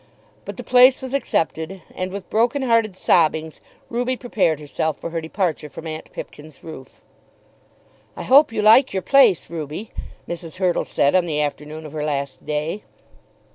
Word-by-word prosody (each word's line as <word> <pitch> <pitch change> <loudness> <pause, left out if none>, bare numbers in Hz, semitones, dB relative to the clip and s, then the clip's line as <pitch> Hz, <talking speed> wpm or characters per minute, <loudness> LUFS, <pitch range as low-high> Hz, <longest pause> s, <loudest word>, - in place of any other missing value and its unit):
But - - -7
the - - -7
place 255 +1 +6
was 260 0 -7
accepted, 175 - -2
and 185 0 -4
with 195 -1 -7
broken 240 +5 +1
hearted 230 -5 +2
sobbings 160 -3 +1 0.3
Ruby 245 +2 -2
prepared 195 - 0
herself 150 +1 -3
for 170 - -7
her 165 0 -3
departure 160 -2 -2
from 160 - -10
aunt 155 -1 -7
Pipkin's 150 -1 -10
roof. 130 -5 -11 1.1
"I - - -6
hope 275 0 +5
you 215 -2 -2
like 225 +4 +6
your 190 -1 -2
place, 255 - +4
Ruby," 160 +5 -6 0.4
Mrs. 170 0 -7
Hurtle 185 -2 0
said 140 - +1
on 185 -1 +3
the 155 -3 -2
afternoon 150 +1 -4
of 150 - -10
her 150 -1 -3
last 140 -2 -3
day. 150 +7 -2
170 Hz, 165 wpm, -21 LUFS, 155-225 Hz, 1.1 s, place